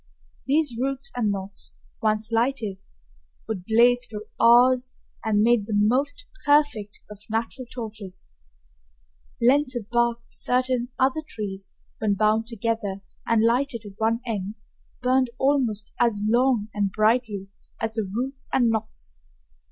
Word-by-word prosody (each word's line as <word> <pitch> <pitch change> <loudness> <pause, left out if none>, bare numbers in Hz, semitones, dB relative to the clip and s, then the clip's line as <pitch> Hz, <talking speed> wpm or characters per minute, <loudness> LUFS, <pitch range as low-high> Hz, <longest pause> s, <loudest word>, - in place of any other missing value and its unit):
These 285 -4 +2
roots 275 +1 -2
and 235 -4 +1
knots, 195 0 -4 0.3
once 215 0 +1
lighted, 225 -4 0 0.7
would 190 -5 -4
blaze 240 +3 +4
for 220 -4 -7 0.2
hours 250 +2 +5 0.3
and 210 -1 +2
made 230 -3 +3
the 215 - -1
most 265 - +1 0.2
perfect 290 -9 +2
of 210 - -10
natural 230 +3 -3
torches. 215 - -8 1.1
Lengths 260 +2 +3
of 225 -4 -4
bark 235 -1 +2
of - - -30
certain 250 -1 0
other 265 +4 +2
trees 205 -10 -6 0.3
when 210 -2 +1
bound 215 +2 +2
together 225 -3 -2 0.3
and 230 -1 +3
lighted 235 -1 +1
at 200 -1 -11
one 225 +2 +1
end 210 -3 -3 0.5
burned 255 0 +3
almost 255 -7 +1
as 215 -4 +2
long 240 -2 +2
and 205 -2 0
brightly 215 -2 +1 0.3
as 225 - -1
the 220 0 -2
roots 260 +5 -4
and 240 -3 +3
knots. 215 - -5
230 Hz, 135 wpm, -25 LUFS, 210-255 Hz, 1.1 s, hours